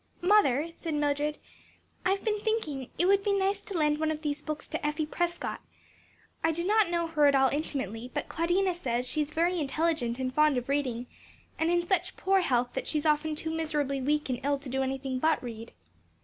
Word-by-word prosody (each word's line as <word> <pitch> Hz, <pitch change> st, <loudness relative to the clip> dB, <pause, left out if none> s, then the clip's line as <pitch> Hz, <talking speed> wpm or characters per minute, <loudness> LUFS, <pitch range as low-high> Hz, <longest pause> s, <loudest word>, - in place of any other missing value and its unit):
"Mother," 335 Hz, -7 st, +4 dB
said 325 Hz, -2 st, -3 dB
Mildred, 295 Hz, 0 st, 0 dB, 0.7 s
"I've 390 Hz, +2 st, +1 dB
been 425 Hz, -1 st, +1 dB
thinking 320 Hz, -, -2 dB
it 350 Hz, -, +2 dB
would 395 Hz, +1 st, +4 dB
be 405 Hz, -1 st, +2 dB
nice 395 Hz, 0 st, +1 dB
to 395 Hz, -3 st, -5 dB
lend 300 Hz, -1 st, +2 dB
one 315 Hz, 0 st, +1 dB
of 310 Hz, 0 st, -3 dB
these 295 Hz, 0 st, -2 dB
books 305 Hz, 0 st, -5 dB
to -, -, -4 dB
Effie 300 Hz, +1 st, 0 dB
Prescott. 345 Hz, +2 st, -2 dB, 0.8 s
I 325 Hz, -, +3 dB
do 340 Hz, +2 st, -2 dB
not 420 Hz, -1 st, +4 dB
know 340 Hz, -1 st, 0 dB
her 305 Hz, -3 st, +3 dB
at 280 Hz, -, +4 dB
all 265 Hz, -1 st, +5 dB
intimately, 250 Hz, -6 st, -3 dB
but -, -, -3 dB
Claudina 355 Hz, +3 st, +1 dB
says 250 Hz, -7 st, -2 dB
she 305 Hz, -, 0 dB
is 295 Hz, -, -2 dB
very 340 Hz, +3 st, +1 dB
intelligent 290 Hz, -4 st, 0 dB
and 255 Hz, -1 st, -2 dB
fond 300 Hz, -2 st, +4 dB
of 245 Hz, +2 st, -3 dB
reading, 255 Hz, -4 st, -1 dB, 0.5 s
and 320 Hz, +1 st, +2 dB
in 345 Hz, 0 st, +2 dB
such 380 Hz, +1 st, 0 dB
poor 385 Hz, 0 st, +3 dB
health 245 Hz, -6 st, +1 dB
that 265 Hz, -, -3 dB
she 310 Hz, -, 0 dB
is 295 Hz, -, -2 dB
often 305 Hz, 0 st, +2 dB
too 320 Hz, +1 st, -3 dB
miserably 300 Hz, -4 st, -1 dB
weak 295 Hz, +3 st, +1 dB
and 250 Hz, -2 st, -2 dB
ill 285 Hz, 0 st, +1 dB
to 275 Hz, -1 st, -10 dB
do 265 Hz, +1 st, -1 dB
anything 265 Hz, 0 st, -2 dB
but 315 Hz, +1 st, +2 dB
read." 230 Hz, -1 st, -7 dB
300 Hz, 210 wpm, -29 LUFS, 270-340 Hz, 0.8 s, all